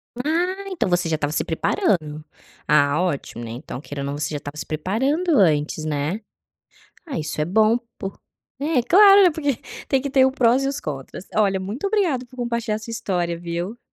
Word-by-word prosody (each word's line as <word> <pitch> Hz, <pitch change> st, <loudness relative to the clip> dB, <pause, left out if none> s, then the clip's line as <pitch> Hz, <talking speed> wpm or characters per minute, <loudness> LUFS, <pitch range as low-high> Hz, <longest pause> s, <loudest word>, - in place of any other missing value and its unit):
Ah, 350 Hz, +9 st, -1 dB
então 365 Hz, -, -1 dB
você 175 Hz, -1 st, +1 dB
já 160 Hz, -, +1 dB
estava 145 Hz, -1 st, -2 dB
se -, -, 0 dB
preparando. 155 Hz, -, 0 dB, 0.4 s
Ah 145 Hz, +2 st, +3 dB
ótimo, 140 Hz, -8 st, -3 dB
né, 115 Hz, -, -7 dB
então 125 Hz, +1 st, -7 dB
queira 145 Hz, -1 st, -7 dB
ou -, -, -3 dB
não 140 Hz, +1 st, -3 dB
você 150 Hz, 0 st, -3 dB
já 150 Hz, -, -2 dB
estava 145 Hz, +1 st, -8 dB
se 155 Hz, -, -5 dB
preparando 265 Hz, -, 0 dB
antes, 155 Hz, -3 st, +2 dB
né. 150 Hz, +6 st, -1 dB, 0.9 s
Ah 285 Hz, -, -5 dB
isso 155 Hz, 0 st, -4 dB
é -, -, +2 dB
bom 220 Hz, +7 st, +3 dB, 0.2 s
por 195 Hz, 0 st, -6 dB, 0.4 s
é 290 Hz, -4 st, +1 dB
claro, 400 Hz, -, +7 dB
né, 360 Hz, -, +6 dB
porque 290 Hz, -3 st, -1 dB, 0.3 s
tem 265 Hz, -1 st, +1 dB
que 280 Hz, -, -3 dB
ter 265 Hz, -1 st, +5 dB
o 265 Hz, -, +1 dB
prós 255 Hz, 0 st, +3 dB
e -, -, +1 dB
os 275 Hz, -, -3 dB
contras. 145 Hz, +5 st, -7 dB
Olha, 195 Hz, -3 st, +2 dB
muito 215 Hz, -, -4 dB
obrigada 350 Hz, -, +1 dB
por 255 Hz, -, -18 dB
compartilhar 235 Hz, -3 st, -2 dB
sua 230 Hz, -, -8 dB
história, 175 Hz, -6 st, -2 dB
viu? 175 Hz, +6 st, -4 dB
200 Hz, 200 wpm, -22 LUFS, -, 0.9 s, claro